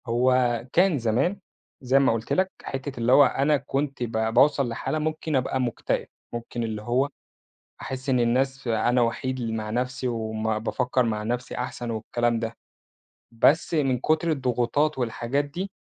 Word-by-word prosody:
هو 125 +2 +3 0.4
كان 175 -4 +4
زمان- 125 - +1 0.4
زي 130 +1 +3
ما 135 -4 +3
قُلت 115 0 -2
لك- 190 0 +1
حِتّة 135 -1 -5
اللي 115 +1 +2
هو 140 +2 +8
أنا 145 +3 +2
كنت 135 0 -3
ب 115 - -3
باوصَل 120 +4 +3
لحالة 135 +6 -2
ممكن 155 0 -2
أبقى 130 0 0
مكتئب، 120 -3 -2 0.3
ممكن 120 0 -4
اللي 110 -2 -3
هو 125 +5 +1 0.7
أحس 130 +1 -6
إن 130 -2 +3
الناس 130 +3 +1
ف - - -7
أنا 120 +2 +2
وحيد 130 +2 -1
ل 115 -2 -2
مع 105 -1 -4
نفْسي 125 +2 -2
وبافكّر 110 +2 -1
مع 110 -3 -1
نفْسي 120 +3 -3
أحسن 120 -1 -4
والكلام 115 +1 0
ده، 115 0 -4 0.8
بس 150 +9 +3
من 135 -5 +2
كُتر 160 +5 +1
الضغوطات 135 +2 0
والحاجات 125 +3 -1
دي 180 +7 -5
125 Hz, 160 wpm, -25 LUFS, 115-140 Hz, 0.8 s, هو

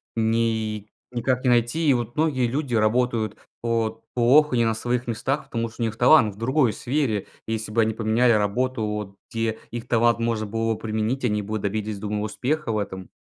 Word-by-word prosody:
ни 110 -2 0 0.2
никак 125 +1 -1
не 130 - +3
найти. 120 +7 +2
И - - +6
вот 120 -1 -2
многие 145 -6 +1
люди 130 0 -2
работают 110 -1 +1 0.3
вот 115 -1 -1
плохо, 130 +4 +4
не 120 -1 +3
на 115 - +2
своих 120 +2 -2
местах, 135 +5 -1
потому 115 -3 -3
что 115 - -10
у - - +2
них 110 -1 -3
талант 120 -5 +5
в - - -20
другой 130 +2 +2
сфере, 125 -6 -1 0.2
если 110 -1 -3
бы 115 +2 +3
они 110 0 +1
поменяли 115 +2 +3
работу, 110 +4 0
вот 105 -2 -4 0.2
где 115 -1 -1
их 120 +1 -6
талант 115 -1 +3
можно 115 -2 -1
было 115 +2 -1
б - - -11
применить, 110 +4 -1
они 105 -3 +1
бы 105 +2 -3
добились, 105 +1 -2
думаю, 105 +1 -3
успеха 130 +6 -2
в 110 - 0
этом. 95 -3 -5
115 Hz, 195 wpm, -24 LUFS, 110-125 Hz, 0.3 s, И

